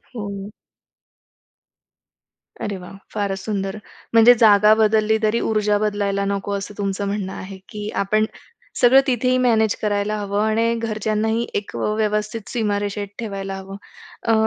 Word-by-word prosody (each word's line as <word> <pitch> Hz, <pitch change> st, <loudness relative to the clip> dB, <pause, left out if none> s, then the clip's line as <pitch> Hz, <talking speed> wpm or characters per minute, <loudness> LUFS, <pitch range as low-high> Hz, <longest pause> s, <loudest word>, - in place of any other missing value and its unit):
हो. 200 Hz, -2 st, -5 dB, 2.1 s
अरे 200 Hz, -1 st, -3 dB
वाह! 180 Hz, +1 st, -11 dB, 0.2 s
फारच 200 Hz, -2 st, -2 dB
सुंदर! 195 Hz, -1 st, -3 dB, 0.4 s
म्हणजे 230 Hz, +2 st, +8 dB
जागा 210 Hz, 0 st, +7 dB
बदलली 220 Hz, 0 st, +3 dB
तरी 215 Hz, +2 st, +2 dB
ऊर्जा 210 Hz, -1 st, +2 dB
बदलायला 200 Hz, -1 st, 0 dB
नको 200 Hz, 0 st, -2 dB
असं 200 Hz, +1 st, -4 dB
तुमचं 200 Hz, 0 st, -2 dB
म्हणणं 200 Hz, -1 st, -3 dB
आहे, 190 Hz, +1 st, -8 dB
की 210 Hz, 0 st, -5 dB
आपण 215 Hz, +2 st, +2 dB, 0.6 s
सगळं 260 Hz, +2 st, +7 dB
तिथेही 255 Hz, 0 st, +2 dB
मॅनेज 220 Hz, -3 st, +3 dB
करायला 205 Hz, 0 st, 0 dB
हवं 205 Hz, 0 st, -1 dB
आणि 230 Hz, +2 st, +2 dB
घरच्यांनाही 220 Hz, 0 st, -1 dB
एक 205 Hz, -, -12 dB
व्यवस्थित 210 Hz, 0 st, -1 dB
सीमारेषेत 205 Hz, -3 st, -1 dB
ठेवायला 195 Hz, -4 st, -4 dB
हवं. 195 Hz, 0 st, -8 dB, 0.5 s
अ, 225 Hz, -, +2 dB
210 Hz, 130 wpm, -21 LUFS, 200-220 Hz, 2.1 s, म्हणजे